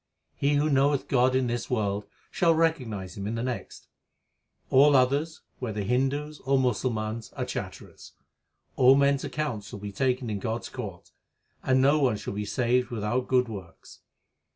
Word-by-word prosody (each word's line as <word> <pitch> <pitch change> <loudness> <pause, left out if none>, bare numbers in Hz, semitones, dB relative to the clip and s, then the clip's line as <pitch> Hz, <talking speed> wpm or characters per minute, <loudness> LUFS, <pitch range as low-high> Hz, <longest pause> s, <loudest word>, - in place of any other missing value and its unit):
He 145 +1 +1
who 145 +2 +2
knoweth 140 -1 +2
God 130 0 +3
in 130 -1 +2
this 120 0 -3
world, 105 -4 -1 0.2
shall 165 -2 +3
recognize 125 - -1
Him 100 0 -5
in 110 - -2
the 115 - -2
next. 125 -2 -5 0.8
All 140 +2 +6
others, 140 +5 +1 0.2
whether 110 -5 -3
Hindus 135 +7 -1
or 135 +1 +1
Musalmans, 115 -3 -1
are - - -3
chatterers. - - -8 0.6
All 130 +1 +7
men 140 0 +4
s 140 - -3
accounts 125 -10 -3
shall 105 - -8
be 100 0 -7
taken 125 +4 0
in 100 - -2
God 115 +3 -3
s - - -8
court; 100 -9 -8 0.5
And 130 0 +2
no 145 +3 +4
one 130 -7 +2
shall - - -6
be 105 +1 -3
saved 125 +3 +1
without 120 +2 -2
good 125 -1 +3
works. 95 -6 -10
125 Hz, 170 wpm, -27 LUFS, 110-140 Hz, 0.8 s, All